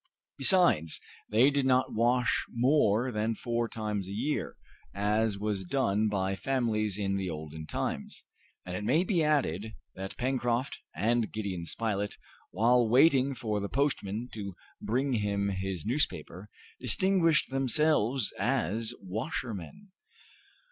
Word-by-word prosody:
Besides, 175 - +4 0.3
they 120 +7 +5
did 140 -2 +1
not 130 0 +2
wash 125 +2 +2
more 125 -2 +2
than 110 0 -1
four 120 -1 -2
times 105 -4 -3
a - - -7
year, 130 +9 -2 0.4
as 105 +1 +1
was 100 -1 -2
done 105 0 +1
by 95 -1 -1
families 110 -2 -1
in 100 -1 -1
the 95 -2 -2
olden 80 -1 -7
times, - - -4 0.4
and 90 0 -5
it 105 - -4
may 140 +11 +3
be 180 -4 +1
added, 110 - 0 0.2
that 95 0 -7
Pencroft 125 0 -1 0.2
and 115 +5 +1
Gideon 95 -6 -4
Spilett, 105 -1 -2 0.3
while 120 +3 +3
waiting 135 +1 +4
for 110 -5 -2
the 100 0 -4
postman 125 -5 -1
to 100 -4 -6 0.3
bring 130 +5 0
him 100 -2 0
his 95 -3 -3
newspaper, 105 - -2 0.3
distinguished 165 - +2
themselves 135 -3 +2
as 115 -1 0
washermen. 120 - -5
110 Hz, 125 wpm, -30 LUFS, 100-130 Hz, 0.4 s, they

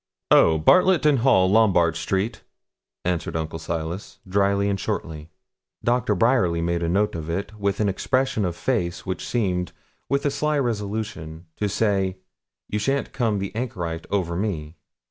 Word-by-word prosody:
'Oh! 80 - +6
Bartlet 180 - +4
and 145 -4 +4
Hall, 105 -7 +4
Lombard 95 -6 +4
Street,' 95 +6 -2 0.6
answered 90 -2 -1
Uncle 80 0 -3
Silas, 85 +4 -5
dryly 100 +1 +2
and 100 -1 0
shortly. 80 -3 -4 0.5
Dr. 120 -3 +1
Bryerly 95 -5 +2
made 85 0 -1
a 85 - 0
note 100 +4 +1
of 80 -1 -5
it, 95 +5 -3
with 100 -1 0
an 105 - +2
expression 130 +4 0
of 90 -3 -1
face 90 -7 -2
which 95 -2 -3
seemed, 90 -7 -1 0.4
with 140 +1 0
a 145 - +2
sly 150 +1 0
resolution, 105 - -3
to 105 - -1
say, 95 -3 0 0.5
'You 105 - -2
shan't 135 +6 -1
come 115 -5 0
the 100 +1 -4
anchorite 90 -9 -4
over 90 -4 -1
me.' 85 -5 -3
100 Hz, 155 wpm, -24 LUFS, 85-110 Hz, 0.6 s, Oh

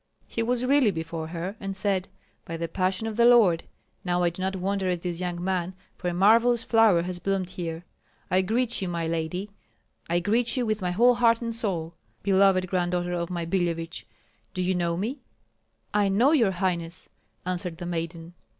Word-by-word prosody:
He 230 - -3
was 245 +2 0
really 275 -3 +4
before 160 -2 -4
her, 175 +4 -5
and 195 -1 -5
said: 195 -2 0 0.4
"By 165 - -6
the 165 0 -3
passion 185 +5 -1
of 220 -1 -4
the 235 - +5
Lord! 215 -9 +5 0.4
Now 180 -1 0
I 170 - +2
do 175 - -8
not 190 +1 -1
wonder 190 0 -1
at 175 -2 -2
this 175 -2 -3
young 175 -1 -3
man, 185 -1 -1 0.2
for 180 - -5
a 175 - 0
marvellous 230 +5 +4
flower 225 -8 +4
has 180 0 -5
bloomed 190 -1 -1
here. 170 -2 -5 0.5
I 185 +1 +4
greet 230 +4 0
you, 190 - -1
my 170 -1 -2
lady, 165 +5 -3 0.6
I 170 +1 +2
greet 230 +7 +1
you 250 - +1
with 215 -1 -1
my 180 - 0
whole 235 +8 +5
heart 230 -1 +3
and 230 0 -2
soul, 175 -8 -2 0.3
beloved 190 -1 +4
granddaughter 175 -1 -1
of 170 0 -2
my 170 -2 -3
Billevich. 170 -1 -2 0.5
Do 185 - -1
you 185 +1 +1
know 170 -1 0
me?" 235 +10 -3 0.7
"I 205 -1 +3
know 230 +9 +4
your 245 -10 +4
highness," 175 -2 -2 0.4
answered 180 -2 -3
the 175 - -6
maiden. 170 0 -4
185 Hz, 190 wpm, -26 LUFS, 175-210 Hz, 0.7 s, the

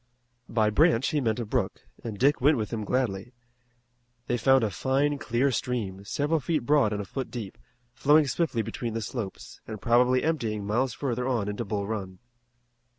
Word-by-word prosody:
By 110 -2 +2
"branch" 140 0 +3
he 150 - 0
meant 110 -4 0
a 120 - -2
brook, 110 -3 -2 0.2
and 110 -3 -5
Dick 140 +6 +3
went 145 +2 +5
with 110 +1 -3
him 110 -2 -2
gladly. 115 -1 -1 0.9
They 120 - 0
found 130 +2 +4
a 105 - 0
fine, 140 +7 0
clear 130 +3 +1
stream, 105 -6 -3
several 150 +8 0
feet 150 -2 -1
broad 145 -7 +3
and 105 -1 -2
a - - -10
foot 130 +6 -5
deep, 115 -6 -6 0.4
flowing 150 +4 +4
swiftly 135 -4 0
between 115 +2 -4
the 115 - -2
slopes, 105 -3 -6
and 110 -1 -6
probably 125 +3 +3
emptying 115 -10 -1
miles 120 +4 0
further 125 -2 -2
on 120 -6 0
into 105 +3 -3
Bull 100 -1 -2
Run. 100 -3 -4
120 Hz, 180 wpm, -27 LUFS, 105-135 Hz, 0.9 s, went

